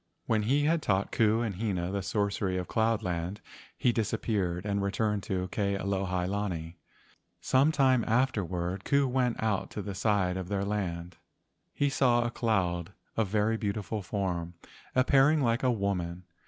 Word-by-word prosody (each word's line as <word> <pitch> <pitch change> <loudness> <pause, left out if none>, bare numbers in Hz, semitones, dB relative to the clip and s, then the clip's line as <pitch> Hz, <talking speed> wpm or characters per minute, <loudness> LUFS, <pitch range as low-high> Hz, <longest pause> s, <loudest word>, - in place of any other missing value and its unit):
When 110 -1 +2
he 135 +7 +2
had 160 +2 +2
taught 100 -5 0
Ku 110 0 +3
and 105 -4 -3
Hina 95 -5 -1
the 100 0 -1
sorcery 100 -1 -1
of 90 - -3
cloud 110 -1 +1
land, 90 +2 -3 0.4
he 125 - +3
disappeared 105 -5 -1
and 100 -1 0
returned 105 +1 0
to 95 -1 -1
Ke 100 0 0
alohi 95 -2 -1
lani. 90 -4 -3 0.6
Some 135 +4 +3
time 130 -5 +3
afterward, 95 -7 0
Ku 140 +3 +2
went 125 -2 +1
out 105 -4 0
to 105 - -5
the 100 - -5
side 95 -2 +1
of 95 -2 -4
their 100 +1 -1
land. 90 -4 -3 0.5
He 145 - 0
saw 125 -3 +3
a 120 - -1
cloud 95 -7 0 0.2
of 110 -2 +1
very 105 +3 +1
beautiful 105 -1 -3
form, 90 -4 -3 0.4
appearing 135 +4 +4
like 115 -1 +2
a 130 - +2
woman. 90 -6 -1
100 Hz, 160 wpm, -29 LUFS, 95-115 Hz, 0.6 s, appearing